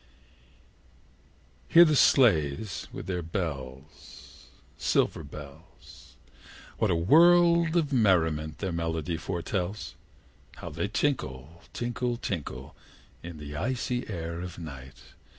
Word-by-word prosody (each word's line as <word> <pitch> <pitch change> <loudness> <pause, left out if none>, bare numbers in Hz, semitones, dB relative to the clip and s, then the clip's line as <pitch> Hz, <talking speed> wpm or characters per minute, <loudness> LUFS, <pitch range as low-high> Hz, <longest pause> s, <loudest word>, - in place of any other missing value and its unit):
Hear 170 +1 +8
the 155 -2 +2
sledges 95 - +3
with - - -7
the 90 -1 -2
bells 75 -5 -7 0.3
Silver - - 0
bells! 70 -3 -13 0.6
What - - +2
a - - +2
world 170 - +5
of 150 -4 0
merriment 80 - +2
their 95 -2 -3
melody 85 0 -2
foretells! 90 +3 -4 0.6
How - - -8
they - - -2
tinkle, 80 - -2
tinkle, 120 0 -2
tinkle, 85 - -5 0.5
In 85 -1 -9
their 75 0 -7
icy 125 0 -2
air 85 -3 -5
of 90 -1 -7
night! 65 -6 -10
85 Hz, 105 wpm, -28 LUFS, 75-120 Hz, 0.6 s, Hear